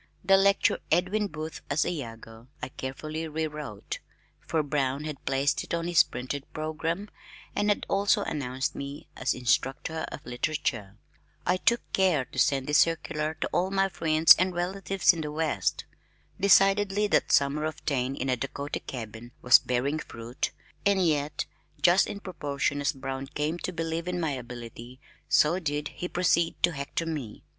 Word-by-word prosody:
The 195 +1 +6
lecture 195 +1 +3
"Edwin 185 +5 +2
Booth 155 -2 -6
as 145 +2 +2
Iago" 115 -6 -6
I 125 - -5
carefully 155 +5 -5
re 160 +1 -2
wrote 150 -9 -6 0.4
for 160 -2 -1
Brown 140 -1 -1
had 150 -2 -6
placed 135 +1 +1
it - - -2
on 170 0 -2
his 175 -1 +6
printed 135 +3 -4
programme 160 +5 -3 0.5
and 205 0 +1
had 205 - +1
also 200 +1 +2
announced 130 -5 -2
me 140 +1 -7
as - - 0
"Instructor 135 +5 0
in - - -6
Literature." 120 -6 -2 0.5
I 180 +1 +2
took 235 +5 +2
care 180 -9 +3
to - - -6
send 135 -2 +3
this 150 +2 +4
circular 160 -1 +1
to - - +1
all 185 +2 +2
my 195 0 +2
friends 160 -2 +6
and 185 0 +1
relatives 190 +1 +2
in 165 - -4
the 150 -1 -4
west. 150 - -1 0.5
Decidedly 200 +1 +4
that 205 - +2
summer 140 +2 +3
of 155 -1 -5
Taine 135 -2 0
in 135 - -3
a 130 - +2
Dakota 140 +3 -4
cabin 115 0 -8
was 125 +1 +8
bearing 135 +5 -1
fruit, 115 -3 -4 0.3
and 195 -2 +3
yet 150 -2 0 0.3
just 180 +2 +5
in 200 - -6
proportion 145 -6 -2
as 145 - +2
Brown 135 0 -5
came 150 +4 -2
to 185 - -3
believe 165 0 -3
in 180 0 -1
my 160 -3 0
ability 120 -1 -8 0.3
so 165 +5 +4
did 150 -3 -2
he 180 - -5
proceed 170 -2 +2
to 175 - +5
"hector" 140 +2 -3
me. 145 -10 -5
155 Hz, 165 wpm, -28 LUFS, 135-175 Hz, 0.5 s, was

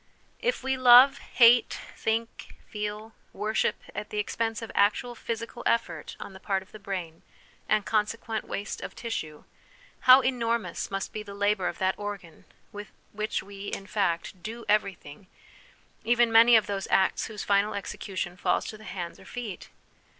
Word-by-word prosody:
If 485 - -1
we 265 0 0
love, 255 +2 +8
hate, 235 -1 +4 0.2
think, 225 +1 -3
feel, 210 +1 -5 0.2
worship, 215 +2 0 0.2
at 210 - -6
the 210 - -5
expense 225 +2 -2
of 225 - -7
actual 215 +4 +2
physical 230 -1 -5
effort 230 0 -1
on 195 - -8
the 190 - -11
part 190 -1 -1
of 190 - -25
the 215 - -11
brain, 180 -5 -5 0.5
and 215 -1 +2
consequent 220 +1 -1
waste 205 - -5
of - - -7
tissue, 155 -10 -5 0.6
how 255 +1 +8
enormous 235 -3 -1
must 195 0 -4
be 215 - -4
the 200 -1 -9
labour 205 -2 +1
of - - -4
that 190 +1 0
organ 205 -5 -7 0.3
with 205 +1 -8 0.2
which 215 +1 -3
we, 200 0 -9
in 195 - -5
fact, 185 -3 -2
do 225 +4 -7
everything, 195 -5 -1 0.8
even 235 +1 +3
many 230 +1 +7
of 220 - +5
those 195 -1 -3
acts 190 - +2
whose 215 -2 -6
final 200 +1 +2
execution 185 -3 -5
falls - - 0
to 215 - -7
the 215 - -13
hands 175 -4 -6
or - - -15
feet 235 -6 -7
210 Hz, 165 wpm, -27 LUFS, 195-230 Hz, 0.8 s, love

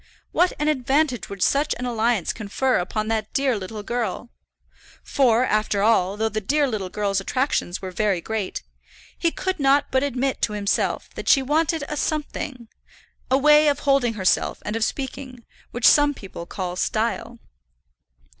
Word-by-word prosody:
What 360 +1 +3
an 300 - -1
advantage 270 -2 +1
would 200 -2 -3
such 285 +2 +2
an 250 - -4
alliance 230 -5 0
confer 245 +4 0
upon 215 +4 -2
that 220 -1 -2
dear 270 -2 +1
little 205 +1 -6
girl; 235 0 -3 0.7
for, 250 -3 +3
after 215 -3 0
all, 200 -3 +2
though 220 +1 +1
the 215 0 -3
dear 285 +8 +1
little 210 -7 -3
girl's 200 -1 -1
attractions 225 -6 -1
were 185 - -4
very 195 -1 0
great, 210 +2 -4 0.5
he 335 - +1
could 375 +2 -3
not 280 +1 +3
but 260 - +2
admit 270 -1 -1
to 210 - 0
himself 200 -1 -1
that - - -4
she 275 - +5
wanted 315 +3 +1
a 300 - -4
something, 290 -5 -3 0.6
a 260 - +4
way 300 +2 +5
of 285 -1 +1
holding 275 -5 +2
herself 190 -3 +1
and 210 - -3
of 225 - 0
speaking, 260 -1 -5 0.2
which 240 -1 -3
some 290 -1 +5
people 185 -6 -9
call 180 -2 -4
style. 230 +4 -2
240 Hz, 165 wpm, -23 LUFS, 210-280 Hz, 0.7 s, she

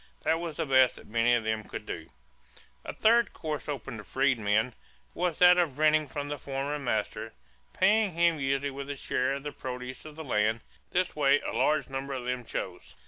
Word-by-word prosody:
That 165 +1 +2
was 170 -3 -5
the - - 0
best 130 -2 +5
that - - -13
many 115 +2 +3
of 115 - 0
them 110 0 -1
could - - -7
do. - - -6 0.7
A - - -5
third 235 +2 +3
course 150 -2 -4
open 135 -3 -5
to 105 - -8
freedmen 115 -3 +1 0.4
was 175 -2 -1
that 180 0 +7
of 155 -7 0
renting 155 0 +3
from 145 +1 -4
the 145 -1 -4
former 140 +2 -3
master, 110 -6 -2 0.4
paying 205 0 +3
him 170 -1 +3
usually 135 +1 0
with 140 +1 -7
a 145 - -3
share 130 0 0
of 140 - -7
the 145 - -4
produce 125 -1 -6
of 155 -1 -10
the 160 - -7
land. 110 -4 +1 0.3
This 180 0 0
way 145 -1 +4
a - - -4
large 140 +4 +2
number 135 +1 -4
of 125 -2 -4
them 125 0 -2
chose. - - -5
140 Hz, 200 wpm, -29 LUFS, 125-155 Hz, 0.7 s, that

